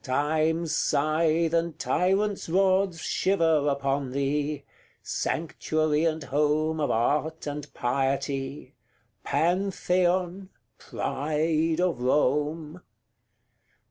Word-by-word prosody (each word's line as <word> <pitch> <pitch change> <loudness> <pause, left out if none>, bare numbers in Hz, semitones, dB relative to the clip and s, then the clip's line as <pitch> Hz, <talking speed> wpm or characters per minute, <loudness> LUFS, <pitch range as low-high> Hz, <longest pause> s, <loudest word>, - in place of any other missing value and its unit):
Time's 155 +4 0
scythe 160 +3 +1
and 165 -1 0
tyrants' 195 +1 0
rods 190 -1 +2
Shiver 165 -6 +2
upon 140 -1 -1
thee 145 +1 -1 0.4
sanctuary 155 0 -1
and 160 -1 -1
home 150 +3 0
Of 145 - 0
art 150 +7 0
and 145 0 -5
piety 135 +1 -2 0.5
Pantheon! 180 +3 0 0.3
pride 155 +3 -1
of 180 -8 0
Rome! 150 +5 0
155 Hz, 80 wpm, -26 LUFS, 145-170 Hz, 0.5 s, rods